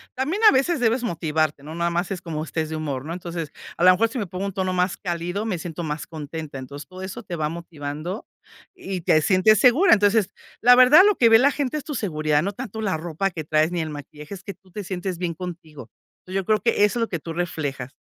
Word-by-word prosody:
también 300 - -1
a - - +4
veces 280 +4 +2
debes 240 +1 +1
motivarte, 155 -7 -1
no 155 +2 -8
nada 170 0 0
más 175 +2 -1
es 185 - -4
cómo 155 -2 -4
estés 160 -1 -3
de 160 - -4
humor, 145 -4 -4
¿no? 165 - -4
Entonces, 170 -3 -5 0.3
a - - -1
la 185 - +9
mejor 225 +5 +2
si 240 - -6
me 210 - -2
pongo 185 +2 -4
un 200 - -4
tono 185 -1 -1
más 180 +1 0
cálido, 175 +3 -3
me 205 -5 -1
siento 170 0 -6
más 150 -1 -4
contenta. 155 -2 -7
Entonces 140 +2 -9
todo 185 0 -11
eso 195 +5 -7
te 175 - -5
va 155 -1 -1
motivando 165 +2 -6 0.5
y 195 - -5
te 155 -1 +3
sientes 190 +5 +4
segura. 265 +11 +6
Entonces, 205 -1 +3 0.3
la 245 +2 +8
verdad, 255 +7 +8
lo 415 -1 +4
que 235 - +5
ve 225 0 +7
la 280 +4 +4
gente 290 0 -2
es 295 - -5
tu 295 - -5
seguridad, 155 - 0
no 200 - -1
tanto 220 -1 -6
la 195 -6 0
ropa 170 +4 -2
que 160 -2 -5
traes 155 +2 +2
ni 175 -1 -1
el 160 - -3
maquillaje, 150 +3 -9
es 190 -2 -9
que 200 - -6
tú 190 -1 -26
te 205 +3 -6
sientes 185 -1 -4
bien 175 -1 -2
contigo. 160 -8 -8 0.4
Entonces, 185 +1 -8
yo 190 - -5
creo 215 +1 +2
que 230 -3 +2
eso 235 +3 -1
es - - 0
lo 230 - 0
que 170 - -3
tú 165 +2 -7
reflejas. 145 -7 -4
180 Hz, 250 wpm, -23 LUFS, 155-215 Hz, 0.5 s, la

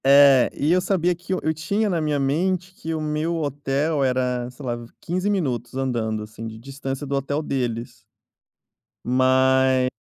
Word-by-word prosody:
É, 140 -2 +7
e 150 +3 +1
eu 180 +1 +4
sabia 180 -2 +1
que 175 +2 -9
eu - - 0
eu 160 - +1
tinha 200 +8 -1
na 175 -5 0
minha 150 -2 0
mente 180 +6 0
que 165 -3 -6
o - - -2
meu 155 +2 -1
hotel 145 0 -1
era, 125 -1 0
sei 130 +3 -11
lá, 120 -1 -1 0.2
15 185 +4 -1
minutos 130 - -1
andando, 115 -5 -1
assim, 110 +1 -8
de 110 0 -8
distância 135 +3 -5
do 140 0 -2
hotel 140 +2 -1
deles. 120 -3 -3 1.0
Ma 130 0 +3
140 Hz, 165 wpm, -23 LUFS, 125-160 Hz, 1.0 s, É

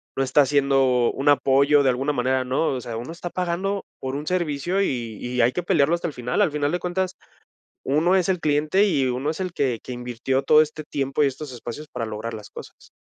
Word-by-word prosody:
no 135 - +1
está 135 +3 +4
haciendo 135 -3 +3
un 140 +2 +1
apoyo 140 +1 +4
de 135 - +3
alguna 135 +4 -1
manera, 130 0 0
¿no?, 130 +5 0
o 130 -2 -2
sea, 115 -1 -6
uno 120 +7 -6
está 175 +1 -6
pagando 185 +3 -2
por 130 0 -4
un 145 +2 -4
servicio 175 +1 0
y 120 - -2
y 125 0 -1
hay 115 +2 +4
que 180 - -2
pelearlo 165 -4 +2
hasta 170 - -3
el 155 - -6
final, 125 -1 -1
al - - +3
final 145 0 -1
de 180 - -1
cuentas, 185 +1 -2 0.7
uno 155 +7 +2
es 185 -2 +1
el 185 -1 +1
cliente 155 +6 +2
y 140 -9 +1
uno 130 +4 -1
es 160 - -6
el 185 -2 -3
que 130 -8 -1
que - - -10
invirtió 125 +2 -2
todo 155 +2 +6
este 155 0 -5
tiempo 140 0 -1
y - - +4
estos 140 +2 -4
espacios 120 +5 -8
para 125 -4 -4
lograr 110 +2 -5
las 105 -1 -9
cosas. - - -12
140 Hz, 230 wpm, -23 LUFS, 125-165 Hz, 0.7 s, todo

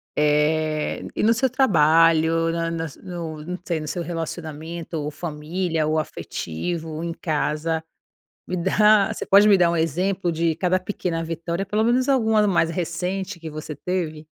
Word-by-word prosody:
eh, 150 +1 +1
e - - -1
no 220 - +4
seu 240 +4 +2
trabalho, 165 - +4
na 165 0 -2
na 165 -1 -2
s 150 - -10
no 170 -4 -6
não 180 +2 -5
sei, 170 -3 -2
no 155 - -6
seu 175 - -3
relacionamento, 165 0 -5
ou 150 0 -3
família 160 +1 -2
ou 155 +1 +1
afetivo 160 - -4
em 170 0 -3
casa, 160 0 -1 0.6
me 180 - -3
dá 210 +3 +4
Você - - -5
pode 200 +2 +6
me 200 - +7
dar 175 -2 +4
um 170 - 0
exemplo 175 +3 0
de 165 0 0
cada 185 0 +1
pequena 175 -5 -3
vitória, 170 +2 -3
pelo 210 +3 0
menos 250 +3 +2
algumas 220 -5 +3
mais 170 -3 +2
recente, 180 +3 -3
que 165 -1 -7
você 155 -1 -7
teve? 160 -2 -3
165 Hz, 165 wpm, -23 LUFS, 155-185 Hz, 0.6 s, me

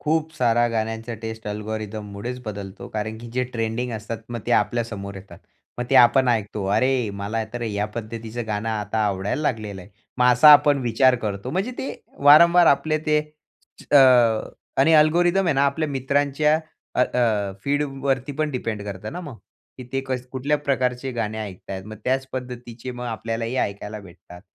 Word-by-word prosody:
खूप 160 +1 0
साऱ्या 120 -3 +3
गाण्यांचा 115 +1 -3
टेस्ट 110 -1 -6
अल्गोरिदममुळेचं 105 +2 -5
बदलतो. 100 -2 -7
कारण 110 +1 -4
की 120 +1 -9
जे 125 +1 0
ट्रेंडिंग 115 +1 -2
असतात. 110 +1 -5
मग 120 -1 -5
ते 120 - +1
आपल्या 120 0 +2
समोर 100 -3 -7
येतात. 95 +1 -12 0.4
मग 120 - -1
ते - - +2
आपण 125 +2 +6
ऐकतो, 105 -3 -1
"अरे, 130 -2 +1
मला 100 +3 -3
तर 120 0 -4
या 105 -2 -1
पद्धतीचं 115 0 -6
गाणं 105 +1 -2
आता 110 0 -2
आवडायला 100 +8 -2
लागलेलं 110 -8 -2
आहे." 100 - -16 0.3
मग 125 0 +5
असा 140 +5 +8
आपण 145 -1 +6
विचार 125 +2 +4
करतो. 100 +3 -3
म्हणजे 190 - -1
ते 265 - -4 0.3
वारंवार 170 +4 +8
आपले 155 +2 +3
ते 150 0 +3 0.6
च - - -14
अ, - - +8 0.8
आणि 160 +4 +5
अल्गोरिदम 175 +5 +4
आहे 165 - +2
ना 135 - +2
आपल्या 155 +2 -1
मित्रांच्या 140 +2 +1 0.4
अ, - - +1
अ, 110 -6 +1
फीडवरती 140 -1 -1
पण 155 -1 0
डिपेंड 115 -5 -3
करतं 100 +1 -6
ना, 180 - -5
मग. 145 -9 -9 0.6
ते 135 - 0
कस 130 -1 -3
कुठल्या 140 +3 0
प्रकारचे 130 -2 -1
गाणे 110 -2 -3
ऐकताहेत. 95 -2 -7
मग 110 +1 -9
त्याचं 130 +1 0
पद्धतीचे 125 -1 -7
मग 125 0 -7
आपल्यालाही 115 +1 -3
ऐकायला 105 -1 -3
भेटतात. 90 -2 -14
120 Hz, 170 wpm, -23 LUFS, 110-135 Hz, 0.8 s, असा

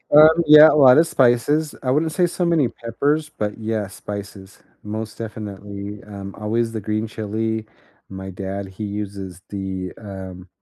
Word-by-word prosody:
Um, 160 +2 +8
yeah, 150 +1 +10
a - - +2
lot 135 -3 +7
of 165 - +6
spices. 145 +1 +2
I 125 - +1
wouldn't 155 +3 +1
say 180 -1 +2
so 175 +1 -2
many 160 -8 +2
peppers, 145 +7 -1
but, 105 -7 -4
yeah, 110 -2 -2
spices. 100 -1 -9 0.2
Most 110 +1 -6
definitely, 105 -2 -7
um, 100 -1 -8
always 115 +2 -1
the 110 - -4
green 110 +2 -2
chili, 110 +1 -3 0.4
my 95 0 -7
dad, 95 +1 -5
he 100 +3 -6
uses 100 -3 -6
the, 95 -2 -4
um, 95 -3 -9
110 Hz, 160 wpm, -21 LUFS, 100-130 Hz, 0.4 s, yeah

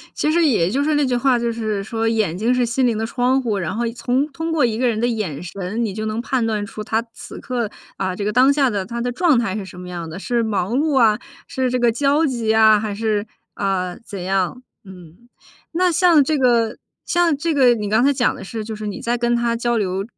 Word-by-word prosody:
其 305 - +1
实 340 +1 +3
也 220 - +3
就 280 +3 +1
是 305 0 +1
那 290 -1 +2
句 255 - 0
话 245 0 +2
就 235 0 -1
是 215 -3 -2
说： 225 +1 -2
“眼 215 -7 0
睛 230 +6 +1
是 250 - +2
心 250 +2 +1
灵 225 -2 0
的 225 - -1
窗 250 +3 +1
户。” 225 -4 -1
然 170 +1 -3
后 235 +1 -1
从 250 +4 0
通 325 +3 -4
过 315 -5 +3
一 220 -2 -1
个 255 - +2
人 220 -2 0
的 240 - +1
眼 210 - -3
神 200 +6 -3
你 200 - -4
就 215 +1 -4
能 215 +1 -2
判 250 -2 -1
断 210 -2 -1
出 210 +1 -7
他 225 +1 -1
此 - - -10
刻， 240 -5 -3 0.3
啊， 185 -1 -2
这 200 - -4
个 210 - 0
当 260 +2 +5
下 280 -2 +3
的 200 -3 -2
他 235 +2 -5
的 245 +1 -1
状 300 0 +3
态 215 -4 -1
是 210 - -4
什 180 -1 -11
么 180 - -8
样 170 -2 -6
的， 165 - -7
是 235 +4 -1
忙 215 -1 -1
碌 290 -1 +1
啊， 215 -2 +4 0.3
是 260 -1 -1
这 255 - 0
个 240 -1 +3
焦 285 +6 +2
急 235 -6 -1
啊， 220 -1 +6
还 210 -2 -3
是， 215 -1 -1 0.3
啊， 185 -3 -2
怎 195 -5 -7
样？ 195 +6 -1 0.2
嗯， 185 +4 -15 0.4
那 360 +1 +2
像 335 -3 +5
这 310 +3 0
个 235 -3 +2 0.3
像 345 -4 +2
这 330 +2 -1
个 255 -4 +5
你 210 -2 -3
刚 220 +4 +2
才 285 - +4
讲 255 -3 +1
的 - - -9
是 220 +3 -5
就 220 0 -5
是 215 0 -6
你 195 - -5
在 240 +1 -1
跟 240 0 +1
他 235 0 0
交 240 0 0
流， 195 -2 -1
230 Hz, 270 characters per minute, -20 LUFS, 205-255 Hz, 0.4 s, 啊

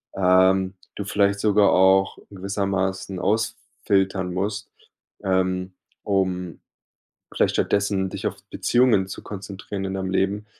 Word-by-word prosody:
ähm, 95 0 +3 0.2
du 100 - -4
vielleicht 100 -1 +1
sogar 105 -1 +4
auch 95 +1 +4
gewissermaßen 95 -1 -2
ausfiltern 95 -3 -1
musst, 100 +3 -3 0.5
ähm, 95 -1 0 0.3
um 95 -3 -1 0.7
vielleicht - - +1
stattdessen 100 -1 +1
dich - - -3
auf - - -4 0.2
Beziehungen 120 -6 +2
zu 95 - -8
konzentrieren 100 0 -6
in 95 - -3
deinem 95 -1 -3
Leben, 100 +2 0
95 Hz, 115 wpm, -23 LUFS, 95-100 Hz, 0.7 s, sogar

